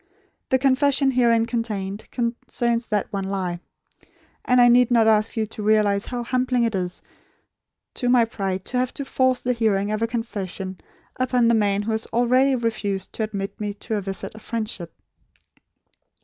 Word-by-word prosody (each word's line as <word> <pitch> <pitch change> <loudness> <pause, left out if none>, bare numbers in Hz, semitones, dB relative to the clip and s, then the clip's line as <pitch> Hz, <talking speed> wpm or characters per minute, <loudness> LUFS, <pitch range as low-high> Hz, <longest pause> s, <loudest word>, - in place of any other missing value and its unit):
The 260 - +4
confession 275 +1 +3
herein 235 -3 +3
contained, 215 -4 -4
concerns 235 0 -2
that 210 0 -2
one 195 -1 -2
lie; 185 -3 -2 0.8
and 250 -1 +3
I 245 - +7
need 245 0 +5
not 230 -2 +4
ask 215 +1 +2
you 220 - +1
to 215 0 -8
realise 210 -1 +2
how 245 -1 -3
humbling 250 0 +1
it 230 -1 0
is 180 -2 -3 0.9
to 245 - -1
my 245 -2 +5
pride 195 -4 -3
to 250 - -2
have 255 0 -1
to 280 - -4
force 260 -1 +1
the 250 - 0
hearing 210 -3 +1
of 215 +1 -2
a 230 - +2
confession 195 -5 -5 0.4
upon 250 -2 +2
the - - +4
man 205 -2 +2
who 225 - -2
has 220 0 -2
already 255 +3 +3
refused 215 -5 -2
to - - -5
admit 200 0 -5
me 205 -1 -3
to 220 - -4
a - - -2
visit 195 0 -5
of 215 - -12
friendship. 215 -8 -4
225 Hz, 175 wpm, -23 LUFS, 200-245 Hz, 0.9 s, I